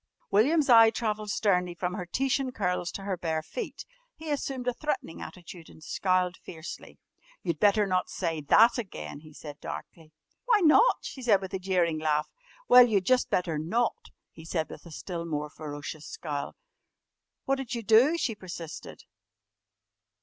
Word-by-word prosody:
William's 280 Hz, +9 st, +3 dB
eye 230 Hz, -3 st, +8 dB
travelled 215 Hz, -2 st, -3 dB
sternly 180 Hz, -4 st, +1 dB
from 180 Hz, +1 st, -3 dB
her 180 Hz, -1 st, -5 dB
Titian 265 Hz, +5 st, 0 dB
curls 180 Hz, -6 st, -1 dB
to 195 Hz, -, -7 dB
her 195 Hz, -1 st, -2 dB
bare 160 Hz, -2 st, -2 dB
feet. 470 Hz, -, -6 dB, 0.3 s
He 315 Hz, -1 st, -6 dB
assumed 270 Hz, -3 st, -3 dB
a 250 Hz, -, +2 dB
threatening 275 Hz, -, -4 dB
attitude 175 Hz, -2 st, -10 dB
and 155 Hz, -, -16 dB
scowled 185 Hz, 0 st, 0 dB
fiercely. 160 Hz, -1 st, -9 dB, 0.5 s
"You 170 Hz, -, 0 dB
better 205 Hz, +6 st, +3 dB
not 185 Hz, -2 st, 0 dB
say 165 Hz, -4 st, -2 dB
that 230 Hz, -, +5 dB
again," 75 Hz, -, -7 dB
he 155 Hz, 0 st, -15 dB
said 145 Hz, -1 st, -10 dB
darkly. 160 Hz, -2 st, -8 dB, 0.3 s
"Why 455 Hz, -4 st, +4 dB
not?" 360 Hz, +9 st, +6 dB
she 265 Hz, -, -8 dB
said 220 Hz, -6 st, +4 dB
with 190 Hz, -1 st, -8 dB
a 190 Hz, -, -2 dB
jeering 180 Hz, -4 st, +1 dB
laugh. 155 Hz, -1 st, +1 dB, 0.4 s
"Well, 250 Hz, 0 st, +9 dB
you'd 200 Hz, -5 st, +1 dB
just 255 Hz, +4 st, +3 dB
better 165 Hz, -4 st, 0 dB
not," 225 Hz, +10 st, -1 dB, 0.2 s
he 160 Hz, -, -13 dB
said 160 Hz, -1 st, -3 dB
with -, -, -11 dB
a -, -, -12 dB
still 170 Hz, +2 st, -5 dB
more 150 Hz, -2 st, -3 dB
ferocious 150 Hz, 0 st, -7 dB
scowl. 145 Hz, -3 st, -5 dB, 0.9 s
"What'd 270 Hz, -2 st, -1 dB
you 235 Hz, -, -4 dB
do?" 240 Hz, +10 st, +5 dB
she 250 Hz, -8 st, -1 dB
persisted. 175 Hz, -5 st, -9 dB
185 Hz, 165 wpm, -28 LUFS, 165-240 Hz, 0.9 s, Well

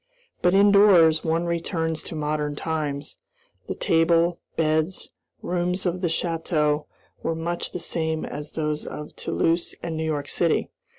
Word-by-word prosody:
But, 180 Hz, +1 st, +4 dB
indoors, 195 Hz, -5 st, +6 dB
one 165 Hz, +1 st, 0 dB
returns 165 Hz, -1 st, -1 dB
to -, -, -6 dB
modern 150 Hz, -1 st, -1 dB
times. 150 Hz, -2 st, -3 dB, 0.5 s
The -, -, -3 dB
table, 165 Hz, +1 st, +3 dB, 0.2 s
beds, 160 Hz, +2 st, 0 dB, 0.3 s
rooms 180 Hz, +1 st, -1 dB
of 180 Hz, 0 st, -1 dB
the 180 Hz, -, +1 dB
château 160 Hz, -3 st, 0 dB, 0.3 s
were 165 Hz, -, -1 dB
much 170 Hz, +2 st, -3 dB
the 180 Hz, -, -4 dB
same 160 Hz, -2 st, -2 dB
as 150 Hz, 0 st, -6 dB
those 150 Hz, -1 st, -2 dB
of 150 Hz, 0 st, -7 dB
Toulouse 170 Hz, +1 st, 0 dB
and 165 Hz, -1 st, -3 dB
New 160 Hz, -, -2 dB
York 145 Hz, -2 st, -2 dB
city. 165 Hz, +1 st, +1 dB
165 Hz, 140 wpm, -25 LUFS, 155-175 Hz, 0.5 s, indoors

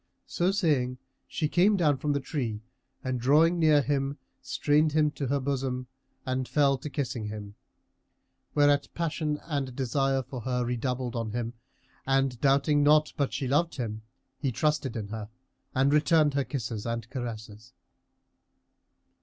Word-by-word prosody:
So 175 Hz, +1 st, 0 dB
saying, 145 Hz, -10 st, +1 dB, 0.3 s
she 155 Hz, -, -1 dB
came 195 Hz, +6 st, +3 dB
down 150 Hz, -6 st, +3 dB
from 145 Hz, +2 st, -1 dB
the 140 Hz, -, 0 dB
tree 120 Hz, -7 st, -3 dB, 0.4 s
and 130 Hz, -1 st, -2 dB
drawing 160 Hz, +7 st, +4 dB
near 155 Hz, -3 st, +5 dB
him 140 Hz, 0 st, -1 dB, 0.2 s
strained 150 Hz, +3 st, +2 dB
him 150 Hz, -1 st, +3 dB
to 140 Hz, -2 st, -4 dB
her 140 Hz, +2 st, +1 dB
bosom 130 Hz, -2 st, -2 dB, 0.4 s
and 130 Hz, 0 st, -1 dB
fell 140 Hz, -3 st, +2 dB
to 150 Hz, -, -6 dB
kissing 130 Hz, -5 st, -3 dB
him; 105 Hz, -1 st, -7 dB, 1.0 s
whereat 145 Hz, -1 st, +4 dB
passion 155 Hz, -3 st, -1 dB
and 140 Hz, -5 st, -3 dB
desire 135 Hz, +1 st, 0 dB
for 125 Hz, -1 st, -7 dB
her 125 Hz, +1 st, -1 dB
redoubled 125 Hz, 0 st, -2 dB
on 115 Hz, -2 st, -3 dB
him 120 Hz, -1 st, -3 dB, 0.5 s
and 135 Hz, -2 st, +1 dB
doubting 140 Hz, +2 st, +3 dB
not 150 Hz, +1 st, +4 dB
but 140 Hz, -2 st, 0 dB
she 135 Hz, -, -2 dB
loved 150 Hz, +6 st, +1 dB
him, 110 Hz, -4 st, -4 dB, 0.4 s
he 135 Hz, -4 st, 0 dB
trusted 150 Hz, -1 st, 0 dB
in 105 Hz, -3 st, -4 dB
her, 110 Hz, -1 st, -6 dB, 0.5 s
and 135 Hz, +2 st, +3 dB
returned 150 Hz, -1 st, +4 dB
her 140 Hz, -1 st, 0 dB
kisses 115 Hz, -5 st, -4 dB
and 115 Hz, 0 st, -3 dB
caresses. 115 Hz, -2 st, -7 dB
135 Hz, 150 wpm, -28 LUFS, 125-150 Hz, 1.0 s, near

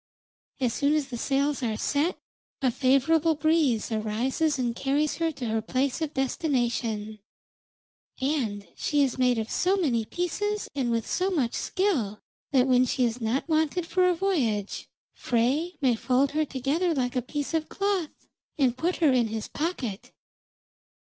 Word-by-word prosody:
As 250 Hz, -4 st, +1 dB
soon 285 Hz, +2 st, +2 dB
as 290 Hz, -3 st, -1 dB
the 240 Hz, -, -5 dB
sails 280 Hz, +3 st, 0 dB
are 225 Hz, -3 st, -1 dB
set 300 Hz, +9 st, 0 dB, 0.4 s
a 260 Hz, -2 st, +2 dB
favourable 290 Hz, +6 st, +3 dB
breeze 300 Hz, -8 st, +2 dB
arises 235 Hz, +8 st, 0 dB
and 240 Hz, -2 st, -1 dB
carries 285 Hz, +3 st, 0 dB
her 330 Hz, -1 st, 0 dB
to 260 Hz, -3 st, -6 dB
her 225 Hz, -1 st, 0 dB
place 260 Hz, +6 st, -1 dB
of 310 Hz, 0 st, -3 dB
destination, 240 Hz, -6 st, -1 dB, 1.0 s
and 245 Hz, -, -1 dB
she 290 Hz, -1 st, +1 dB
is 260 Hz, -1 st, -1 dB
made 250 Hz, -2 st, +3 dB
of 220 Hz, 0 st, -3 dB
so 375 Hz, +2 st, +2 dB
many 255 Hz, -, +1 dB
pieces, 415 Hz, -, -2 dB
and 265 Hz, -4 st, -1 dB
with 230 Hz, -1 st, 0 dB
so 370 Hz, +1 st, 0 dB
much 280 Hz, -11 st, 0 dB
skill, 285 Hz, -, 0 dB, 0.3 s
that 260 Hz, -3 st, +4 dB
when 255 Hz, -1 st, +4 dB
she 250 Hz, 0 st, +1 dB
is 235 Hz, +1 st, -2 dB
not 230 Hz, +7 st, -1 dB
wanted 315 Hz, +2 st, +1 dB
for 365 Hz, +2 st, +2 dB
a 355 Hz, -, +2 dB
voyage 260 Hz, -, -1 dB, 0.2 s
Frey 270 Hz, +9 st, 0 dB
may 260 Hz, -3 st, +4 dB
fold 260 Hz, +4 st, +1 dB
her 310 Hz, +1 st, +1 dB
together 295 Hz, +6 st, 0 dB
like 250 Hz, -1 st, -1 dB
a 250 Hz, -, +1 dB
piece 290 Hz, +4 st, -4 dB
of 320 Hz, -1 st, -1 dB
cloth, 395 Hz, -5 st, -2 dB, 0.3 s
and 255 Hz, -4 st, +2 dB
put 350 Hz, +2 st, +1 dB
her 305 Hz, -6 st, +3 dB
in 245 Hz, -3 st, +3 dB
his 220 Hz, -1 st, -4 dB
pocket." 275 Hz, -, -4 dB
270 Hz, 165 wpm, -27 LUFS, 240-320 Hz, 1.0 s, that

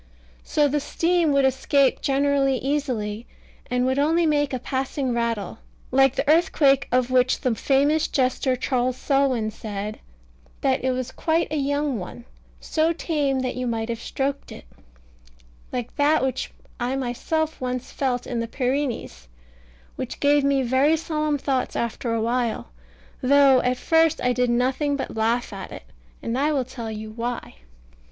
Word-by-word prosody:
So 295 Hz, -1 st, +2 dB
the 295 Hz, +1 st, 0 dB
steam 335 Hz, +2 st, +1 dB
would 275 Hz, -1 st, +3 dB
escape 265 Hz, +1 st, +2 dB
generally 275 Hz, -1 st, +2 dB
easily, 245 Hz, -6 st, -2 dB, 0.4 s
and 250 Hz, 0 st, +1 dB
would 260 Hz, +2 st, +1 dB
only 325 Hz, +4 st, +3 dB
make 290 Hz, -2 st, +1 dB
a 260 Hz, -, -1 dB
passing 265 Hz, 0 st, -2 dB
rattle, 230 Hz, -3 st, -2 dB, 0.3 s
like 270 Hz, 0 st, +4 dB
the -, -, -1 dB
earthquake 285 Hz, -4 st, +4 dB
of 250 Hz, 0 st, +2 dB
which 255 Hz, 0 st, +3 dB
the 255 Hz, -, +1 dB
famous 285 Hz, +6 st, +2 dB
jester 260 Hz, 0 st, +1 dB
Charles 255 Hz, 0 st, -1 dB
Selwyn 265 Hz, -6 st, +1 dB
said 210 Hz, 0 st, -6 dB, 0.6 s
that 265 Hz, -2 st, +1 dB
it 260 Hz, -, +1 dB
was 255 Hz, 0 st, -2 dB
quite 325 Hz, -1 st, 0 dB
a -, -, -1 dB
young 285 Hz, -3 st, 0 dB
one, 215 Hz, +6 st, -9 dB, 0.3 s
so 320 Hz, +1 st, +1 dB
tame 290 Hz, -5 st, -1 dB
that 255 Hz, -1 st, -2 dB
you 250 Hz, 0 st, -3 dB
might 225 Hz, -1 st, -2 dB
have 230 Hz, -1 st, -3 dB
stroked 275 Hz, +3 st, -3 dB
it; -, -, -10 dB, 1.1 s
like 245 Hz, -2 st, -4 dB
that 295 Hz, 0 st, +3 dB
which 265 Hz, -1 st, -2 dB, 0.3 s
I 250 Hz, +2 st, -1 dB
myself 270 Hz, +5 st, -2 dB
once 255 Hz, 0 st, -3 dB
felt 250 Hz, -3 st, -1 dB
in 240 Hz, -, -3 dB
the 230 Hz, -, -2 dB
Pyrenees, 250 Hz, -, -2 dB, 0.7 s
which 255 Hz, -, -5 dB
gave 290 Hz, 0 st, +3 dB
me 275 Hz, -1 st, +2 dB
very 265 Hz, +6 st, +3 dB
solemn 305 Hz, -2 st, -1 dB
thoughts 265 Hz, -2 st, -1 dB
after 235 Hz, 0 st, -2 dB
a 230 Hz, -1 st, 0 dB
while, 235 Hz, -, -1 dB, 0.5 s
though 275 Hz, 0 st, +5 dB
at 250 Hz, 0 st, 0 dB
first 325 Hz, +2 st, +3 dB
I 250 Hz, 0 st, +1 dB
did 250 Hz, 0 st, +1 dB
nothing 260 Hz, +4 st, +1 dB
but 275 Hz, -, -5 dB
laugh 230 Hz, +1 st, 0 dB
at 195 Hz, -, -7 dB
it; -, -, -9 dB, 0.4 s
and 235 Hz, +3 st, -1 dB
I 295 Hz, +2 st, +2 dB
will 265 Hz, -3 st, 0 dB
tell 235 Hz, -3 st, -7 dB
you 215 Hz, 0 st, -6 dB
why. 235 Hz, +2 st, -4 dB
260 Hz, 160 wpm, -24 LUFS, 245-285 Hz, 1.1 s, though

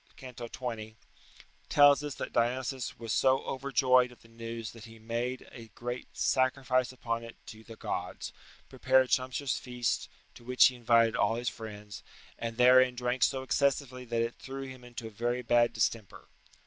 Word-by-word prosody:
c. 130 Hz, -1 st, -9 dB
20), 115 Hz, -2 st, -6 dB, 0.7 s
tells 145 Hz, 0 st, +6 dB
us 145 Hz, -2 st, -4 dB
that -, -, -6 dB
Dionysius 125 Hz, +2 st, -1 dB
"was 115 Hz, -1 st, -4 dB
so 130 Hz, 0 st, +3 dB
overjoyed 130 Hz, -2 st, +2 dB
at 120 Hz, -, -17 dB
the -, -, -18 dB
news 115 Hz, -1 st, -7 dB
that 115 Hz, -1 st, -12 dB
he 115 Hz, 0 st, -13 dB
made 120 Hz, +3 st, -4 dB
a 115 Hz, -2 st, -11 dB
great 120 Hz, +1 st, -6 dB
sacrifice 130 Hz, -1 st, +1 dB
upon 115 Hz, -2 st, -3 dB
it 115 Hz, 0 st, -10 dB
to 110 Hz, 0 st, -11 dB
the 115 Hz, 0 st, -11 dB
gods, -, -, -5 dB, 0.3 s
prepared 130 Hz, -1 st, +2 dB
sumptuous 130 Hz, +2 st, 0 dB
feasts, 125 Hz, -1 st, -2 dB, 0.2 s
to -, -, -15 dB
which 125 Hz, +1 st, +5 dB
he 130 Hz, -, -9 dB
invited 115 Hz, -2 st, +3 dB
all 115 Hz, +2 st, +2 dB
his 120 Hz, 0 st, -1 dB
friends, 105 Hz, -3 st, -9 dB, 0.4 s
and 115 Hz, -1 st, -4 dB
therein 125 Hz, 0 st, +6 dB
drank 125 Hz, +1 st, -2 dB
so 130 Hz, -1 st, +2 dB
excessively 130 Hz, -1 st, 0 dB
that 115 Hz, -1 st, -1 dB
it 115 Hz, +1 st, -3 dB
threw 135 Hz, 0 st, -6 dB
him 130 Hz, -2 st, -9 dB
into 120 Hz, -1 st, -8 dB
a 110 Hz, -, -7 dB
very 120 Hz, +4 st, -2 dB
bad 120 Hz, 0 st, +3 dB
distemper." 110 Hz, -5 st, -2 dB
120 Hz, 170 wpm, -30 LUFS, 115-130 Hz, 0.7 s, tells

